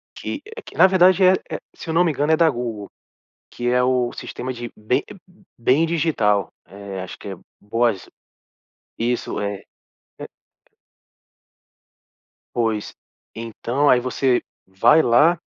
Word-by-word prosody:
que - - -5 0.2
que - - -13
na 185 - +8
verdade 185 0 +4
é 185 0 +7 0.2
é - - -4 0.2
se - - -10
eu - - -1
não 170 +2 +4
me 170 - +2
engano 145 +1 0
é 160 - +4
da 165 -1 +5
Google, 120 -6 -4 0.6
que 120 - -5
é 125 0 +3
o 125 -1 +1
sistema 130 +1 -6
de 120 -1 -7
bem 110 +4 0 0.5
bem 130 +7 +3
digital. 130 - +1 0.2
Eh, 100 +1 -8
acho 95 - -8
que - - -9
é 95 - -5 0.3
boas, 115 -2 0 0.9
isso, 120 +1 -2
eh, 100 -1 -4 0.6
é. - - -7 2.3
Pois, 110 -3 -1 0.4
então, 115 +5 -1
aí 125 - +6
você 130 0 +1 0.3
vai 115 +11 +4
lá 150 +8 +4
120 Hz, 140 wpm, -21 LUFS, 105-155 Hz, 2.3 s, na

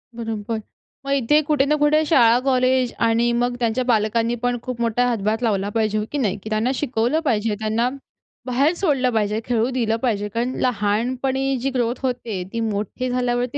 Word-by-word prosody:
बरोबर. 225 -1 -4 0.4
मग 275 - -3
इथे 280 +3 +3
कुठे 295 -3 +3
ना 300 +2 +2
कुठे 305 +1 +4
शाळा 240 -6 +5
कॉलेज 255 -1 +2
आणि 230 +1 +2
मग 245 0 0
त्यांच्या 235 +1 0
पालकांनी 230 0 +1
पण 245 0 +1
खूप 250 -2 -5
मोठा 235 +1 +1
हातभार 220 -1 -1
लावला 205 -4 0
पाहिजे. 215 0 0
हो 210 - -1
की 295 - -2
नाही? 210 -7 0
की 215 - -6
त्यांना 220 +4 +1
शिकवलं 245 +1 0
पाहिजे, 220 -4 +1
त्यांना 220 +3 0 0.6
बाहेर 270 +6 +2
सोडलं 290 -9 +1
पाहिजे, 210 -1 0
खेळू 235 0 +1
दिलं 235 -4 0
पाहिजे. 210 -5 0
कारण 235 +4 -2
लहानपणी 255 +5 0
जी 270 - 0
ग्रोथ 240 -1 +1
होते, 240 -7 -2
ती 230 - -2
मोठी 215 +5 -3
झाल्यावरती 245 +1 -1
240 Hz, 175 wpm, -21 LUFS, 220-255 Hz, 0.6 s, शाळा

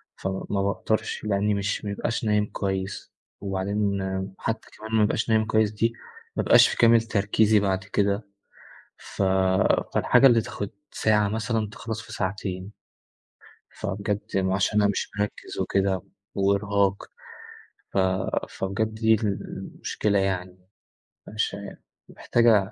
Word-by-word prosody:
ف - - -5
ما 95 +1 -2
باقدرش 105 +2 -1
لأني 105 0 +1
مش 100 +1 -2
ما 100 - -2
بابقاش 110 +3 -2
نايم 105 -1 +2
كويس 95 -1 -4 0.3
وبعدين 100 +1 -1 0.4
حتى 115 - -3
كمان 110 +1 -9
ما 110 - +5
أبقاش 110 +2 0
نايم 110 -1 +3
كويس 110 -1 +2
دي، 115 +2 0 0.4
ما - - 0
أبقاش - - +7
في - - -3
كامل 115 -1 +6
تركيزي 105 0 +2
بعد 95 -1 0
كده، 100 +1 0 0.7
ف - - -7 0.7
فالحاجة 135 - +5
اللي 120 -3 +5
تاخد 100 -1 -5 0.2
ساعة 105 -1 +2
مثلًا 110 0 -1
تخلص 110 +2 -5
في 110 -1 -11
ساعتين. 95 0 -3 1.1
فبجد 100 0 -2 0.2
م 95 -1 +1
عشان 100 +2 +2
أنا 100 - +4
مش 100 - -2
مركز 105 - -4
وكده 95 -2 +1 0.3
وإرهاق، 100 0 +1 0.9
ف - - -1 0.5
فبجد 105 +3 -2
دي 110 0 +3
المشكلة 100 0 -2
يعني، 95 -1 -2 0.7
مش 105 -1 -2
عا 100 0 -8 0.3
محتاج 120 -1 0
أ 105 -2 +4
100 Hz, 130 wpm, -25 LUFS, 100-110 Hz, 1.1 s, أبقاش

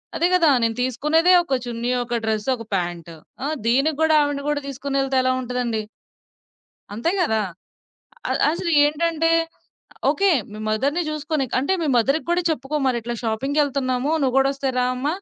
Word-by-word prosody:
అదే 345 - +2
గదా! 340 -4 +5
నేను 225 0 +1
తీసుకునేదే 300 +8 +2
ఒక 275 -6 0
చున్నీ, 240 0 -3
ఒక 240 0 -2
డ్రస్సు, 220 +1 -1
ఒక 230 - -9
ప్యాంటు. 175 -2 -4 0.3
ఆ! - - 0 0.2
దీనికి 275 +5 +2
గూడా 320 0 +4
ఆవిడని 290 -1 -2
గూడా 295 -1 -1
తీసుకొనెళ్తే 275 0 -1
ఎలా 255 0 +2
ఉంటదండి? 245 -3 -2 1.1
అంతే 235 +10 0
గదా! 220 -11 +1 0.9
అ - - +2 0.2
అసలు 340 +1 -3
ఏంటంటే 330 +2 +1 0.8
ఓకే, 395 +7 +2 0.2
మీ 210 - -8
మదర్‌ని 275 +10 0
జూసుకోనీక్ 305 -3 -2
అంటే, 280 +8 0
మీ - - 0
మదర్‌కి 275 +7 +2
గూడా 350 +1 +1
చెప్పుకో 300 -1 -2
మరిట్లా 240 -2 -1
షాపింగ్‌కెళ్తన్నాము, 270 +2 0
నువ్వు 260 -3 0
గూడొస్తే 275 0 +1
రా 250 - +2
అమ్మ, 255 +3 -4
270 Hz, 150 wpm, -22 LUFS, 240-300 Hz, 1.1 s, గదా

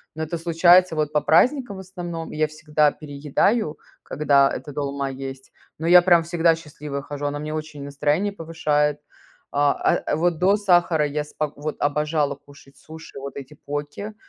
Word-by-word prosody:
но 160 - -3
это 165 +2 -4
случается 175 +1 +4
вот 150 -1 -1
по 150 - +2
праздникам 245 - +2
в - - -8
основном. 175 -3 -7
И 155 - -7
я 155 0 +2
всегда 150 -1 +1
переедаю, 150 - -1 0.2
когда 140 -2 +2
эта 145 - -6
долма 140 -1 -3
есть, 135 0 -8 0.3
но 160 - -5
я 180 +1 +8
прям 175 -2 +4
всегда 170 -1 +2
счастливая 150 -3 -7
хожу, 145 0 -6
она 145 0 -3
мне 155 +1 -5
очень 155 -2 -6
настроение 150 +8 -1
повышает. 150 -4 0 0.6
А, 145 0 +2
э, - - +1
вот 165 0 0
до 195 +3 +4
сахара 175 -6 +3
я 150 +1 -2
спок 150 0 -4
вот, 150 +1 -4
обожала 150 0 0
кушать 140 -1 -19
суши, 160 +1 -11
вот 140 0 -8
эти 135 +1 -9
поки, 145 +8 -6
150 Hz, 170 wpm, -23 LUFS, 145-170 Hz, 0.6 s, я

